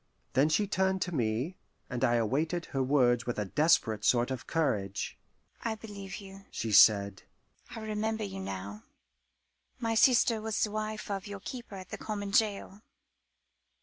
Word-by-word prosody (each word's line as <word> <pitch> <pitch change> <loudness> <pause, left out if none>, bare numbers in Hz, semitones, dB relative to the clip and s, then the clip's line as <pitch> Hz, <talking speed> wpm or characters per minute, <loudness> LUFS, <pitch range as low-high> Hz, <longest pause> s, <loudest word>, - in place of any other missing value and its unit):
Then 135 +4 +4
she 205 +7 +2
turned 190 -1 +1
to 180 - -5
me, 125 +6 -1 0.3
and 125 -2 -4
I 120 - +4
awaited 150 +9 0
her 135 - -2
words 125 -3 +3
with 120 - -2
a 105 - -1
desperate 110 - +2
sort 120 +2 +3
of 130 - -5
courage. 105 - -1 0.5
"I 225 -1 -2
believe 200 -3 -8
you," 195 -1 -11
she 110 - -4
said. 100 -1 +6 0.5
"I 225 - -6
remember 220 0 -2
you 195 -1 -5
now. 100 - -6 1.0
My 225 -1 0
sister 230 -1 +4
was 220 -1 -1
the 210 - 0
wife 215 0 -4
of 195 0 -3
your 200 -1 -6
keeper 240 -2 -7
at 185 -1 -9
the - - -6
common 205 -2 -4
jail. 205 -2 +1
185 Hz, 160 wpm, -30 LUFS, -, 1.0 s, said